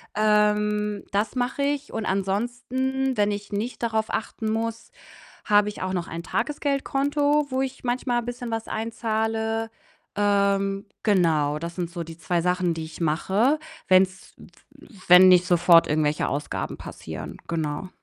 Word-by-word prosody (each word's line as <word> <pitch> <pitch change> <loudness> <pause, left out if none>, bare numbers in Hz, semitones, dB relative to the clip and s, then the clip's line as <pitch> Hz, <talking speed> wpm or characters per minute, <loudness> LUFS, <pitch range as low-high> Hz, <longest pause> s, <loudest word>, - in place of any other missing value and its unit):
Ähm, 210 -1 +2
das 205 +3 -1
mache 250 +2 -1
ich 285 0 -1
und 220 -1 -3
ansonsten, 245 +7 -1
wenn 205 0 +2
ich 205 0 -6
nicht 220 +5 -4
darauf 220 -1 0
achten 220 0 -3
muss, 225 +1 -3 0.5
habe 205 0 +4
ich 210 - -7
auch 185 0 -2
noch 175 -2 -3
ein 170 +1 -6
Tagesgeldkonto, 285 +1 0
wo 260 +1 0
ich 265 0 -5
manchmal 245 0 0
bisschen 245 0 -6
was 225 0 -3
einzahle. 225 0 -2 0.5
Ähm, 200 -1 +1 0.2
genau, 160 -8 +2
das 170 +1 -6
sind 175 -2 -3
so 170 0 -5
die 165 0 -10
2 170 +1 0
Sachen, 180 -1 +1
die 165 0 -5
ich 160 +2 -11
mache, 190 - +2 0.3
wenn's 185 0 +2
w - - -15 0.6
wenn 180 +1 +9
nicht 180 -1 +6
sofort 175 -1 +5
irgendwelche 150 0 +1
Ausgaben 145 +1 -3
passieren. - - -8
Genau. 160 +1 -3
210 Hz, 145 wpm, -25 LUFS, 180-235 Hz, 0.6 s, wenn